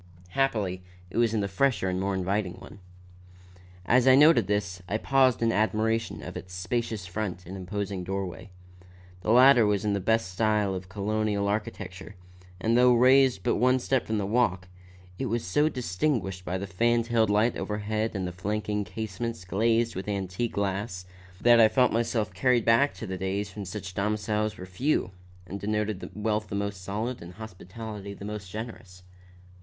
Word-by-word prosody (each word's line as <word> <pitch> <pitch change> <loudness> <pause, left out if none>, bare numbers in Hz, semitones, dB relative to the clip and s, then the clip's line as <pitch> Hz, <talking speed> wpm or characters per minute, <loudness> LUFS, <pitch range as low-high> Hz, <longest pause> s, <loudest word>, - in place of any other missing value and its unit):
Happily 100 -6 0 0.3
it - - -5
was 120 -2 +3
in 105 - +1
the 100 - -1
fresher 100 -1 +1
and 90 0 -1
more 100 0 -1
inviting 95 0 -1
one. 95 +2 -13 1.1
As 125 +5 +4
I 130 - +8
noted 150 +4 +6
this, 95 -3 -1
I 105 - +1
paused 130 -1 +3
in 115 - +3
admiration 110 +1 0
of - - -7
its 90 +1 -8
spacious 105 +2 -2
front 90 -1 -4
and 95 +3 -8
imposing 95 0 -4
doorway. 95 +1 -5 0.7
The 105 - -4
latter 125 +1 +7
was 105 0 0
in 105 - +1
the 100 - 0
best 110 0 +1
style 105 0 +1
of 95 0 -6
Colonial 105 0 -1
architecture, 105 -2 -4 0.4
and 115 +4 +1
though 125 0 +6
raised 130 -4 +5
but - - +1
one 125 +3 +4
step 130 0 0
from 110 - -1
the 100 - -1
walk, 95 -4 +1 0.5
was 120 -3 -1
so 150 +12 +2
distinguished 95 - -2
by 90 +1 -2
the 100 - -4
fan 115 +5 +1
tailed 115 -2 +2
light 105 +3 +2
overhead 105 +1 -2
and 95 -1 -2
the 90 - -3
flanking 105 +3 -2
casements 110 +2 -5
glazed 115 +5 +1
with 95 +2 -5
antique 100 +3 -2
glass, 100 -2 -2 0.3
that 120 +1 +6
I 110 - +8
felt 125 +3 +2
myself 115 -1 0
carried 125 -3 +2
back 125 +5 +4
to - - -7
the 95 -2 -5
days 95 +1 -3
when 105 -2 -5
such 95 0 -6
domiciles 105 +1 -1
were 90 - -7
few 95 +2 0 0.3
and 100 +1 -6
denoted 105 -1 -2
wealth 105 0 -1
the 100 - -5
most 100 -1 -3
solid, 110 +6 -3
and 85 +1 -10
hospitality 105 0 -8
the 100 - -9
most 105 -2 -6
generous. 105 -4 -8
105 Hz, 175 wpm, -27 LUFS, 95-115 Hz, 1.1 s, I